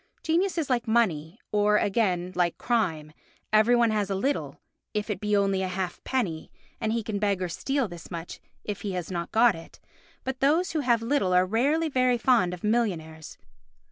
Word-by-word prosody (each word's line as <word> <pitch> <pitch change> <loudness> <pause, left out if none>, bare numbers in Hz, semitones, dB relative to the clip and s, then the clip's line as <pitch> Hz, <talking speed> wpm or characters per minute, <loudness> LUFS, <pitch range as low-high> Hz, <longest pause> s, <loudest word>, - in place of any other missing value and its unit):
Genius 345 +3 +1
is 320 -4 0
like 245 -3 0
money, 195 -5 +1
or, 210 0 +3
again, 185 -4 0
like 175 -2 0
crime, 165 -11 -1 0.4
every 220 +3 +5
one 235 -2 +3
has 210 -2 0
a 195 - 0
little, 270 +9 -2 0.4
if 210 +1 -1
it 195 - -3
be 210 -1 +1
only 195 -1 +1
a 190 - -1
half 185 -1 -4
penny, 195 -12 -2 0.3
and 220 - -1
he 230 0 -1
can 205 -1 -3
beg 200 -2 +1
or 185 - -1
steal 270 - -1
this 175 -3 -10
much 170 -1 -7 0.2
if 205 -2 -5
he 200 -2 -3
has 180 0 -4
not 170 -1 -4
got 230 0 +5
it; 165 -1 -12 0.4
but 265 0 -4
those 315 +7 +2
who 315 - -1
have 240 -5 +2
little 230 -7 +1
are 180 0 +5
rarely 280 - +1
very 255 -4 +2
fond 235 -7 +3
of 180 -1 -8
millionaires. 175 -9 -2
210 Hz, 195 wpm, -27 LUFS, 180-240 Hz, 0.4 s, every